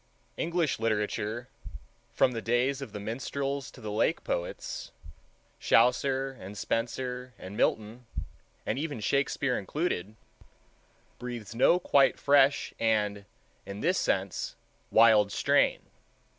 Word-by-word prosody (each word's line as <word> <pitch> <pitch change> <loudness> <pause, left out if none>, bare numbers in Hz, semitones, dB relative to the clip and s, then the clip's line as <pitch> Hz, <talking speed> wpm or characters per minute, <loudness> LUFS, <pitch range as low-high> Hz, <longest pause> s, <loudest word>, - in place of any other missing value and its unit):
English 170 -6 0
literature, 110 +1 -1 0.6
from 130 - +3
the 115 -2 -4
days 125 +4 +1
of 135 - -7
the 105 - -6
minstrels 135 +5 -3
to - - -15
the 110 -3 -5
Lake 105 - +1
Poets—Chaucer 125 - -1
and 100 +3 -9
Spenser 125 +3 -3
and 95 +2 -9
Milton, 110 +3 -1 0.6
and - - -1
even 145 -5 -3
Shakespeare 140 +2 0
included—breathes 110 - -7
no 130 +9 +5
quite 140 -6 +4
fresh 140 0 +3
and 105 -3 +1 0.4
in 100 +1 -6
this 180 +3 +2
sense 95 -1 -1 0.3
wild 105 -3 +6
strain. - - +2
120 Hz, 105 wpm, -29 LUFS, 105-135 Hz, 0.6 s, wild